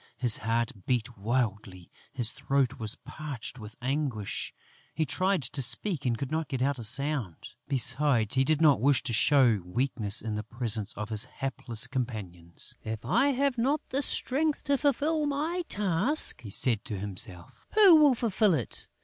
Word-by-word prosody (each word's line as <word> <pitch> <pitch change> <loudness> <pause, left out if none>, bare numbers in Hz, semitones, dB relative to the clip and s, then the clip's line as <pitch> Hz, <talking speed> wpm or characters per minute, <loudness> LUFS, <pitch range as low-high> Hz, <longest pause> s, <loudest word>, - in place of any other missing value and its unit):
His 120 -4 0
heart 115 +1 -1 0.2
beat 120 -1 -1
wildly, 105 -5 -3 0.2
his 120 -4 +1
throat 135 -1 -1
was 110 -2 -2
parched 130 -5 -6
with 105 0 -10
anguish, 130 -6 -2 0.4
he 160 - 0
tried 185 +2 0
to 135 +3 -2
speak 145 - +1
and 120 -1 0
could 135 +4 -5
not 160 -1 -1
get 130 - -3
out 140 -1 0
a - - -6
sound: 130 - 0 0.2
besides, 135 -4 +2
he 130 0 +3
did 155 +3 +1
not 145 -7 +5
wish 140 +1 +3
to 120 - -3
show 120 -4 +4
weakness 110 +1 -2
in 110 0 -4
the 105 - -2
presence 110 -2 -2
of 105 +1 -5
his 110 -1 0
hapless 130 -3 -2
companions! 105 -10 -3
"If 110 0 -6
I 255 +4 +3
have 275 -2 0
not 275 +6 +1
the 270 +2 -1
strength 290 +2 0
to 280 -1 +1
fulfil 295 +2 +1
my 310 +5 -1
task," 205 - +2
he 110 - -9
said 110 +2 +2
to 105 -4 -4
himself, 95 -3 -5
"who 395 -6 +8
will 295 -4 +5
fulfil 215 -5 +2
it? 125 -7 -5
130 Hz, 170 wpm, -28 LUFS, 110-185 Hz, 0.4 s, who